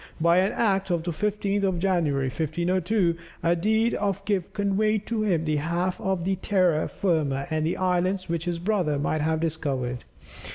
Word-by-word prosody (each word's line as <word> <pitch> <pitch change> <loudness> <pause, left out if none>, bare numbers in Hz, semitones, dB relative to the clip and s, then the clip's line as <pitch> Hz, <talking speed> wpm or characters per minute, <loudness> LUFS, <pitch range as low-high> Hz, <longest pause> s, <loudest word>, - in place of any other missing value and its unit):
By 170 +2 +4
an 190 +2 +2
act 195 -4 +1
of 170 -2 0
the 175 - -2
15th 205 +3 -1
of 190 -3 +1
January, 170 -7 +1
1502, 175 +6 0 0.3
a 170 +1 +3
deed 220 +6 +2
of 200 -1 -2
gift 195 -4 -1
conveyed 210 +1 0
to 230 -2 -1
him 175 -7 +1
the 155 -1 +1
half 170 +4 -1
of 190 -3 -1
the 190 0 0
terra 180 -5 +2
firma 150 -7 0
and 155 0 0
islands 185 +1 0
which 165 -1 -2
his 175 -1 -1
brother 175 -5 0
might 150 +2 -1
have 160 +1 +1
discovered. 140 -6 -2
175 Hz, 170 wpm, -26 LUFS, 160-195 Hz, 0.3 s, By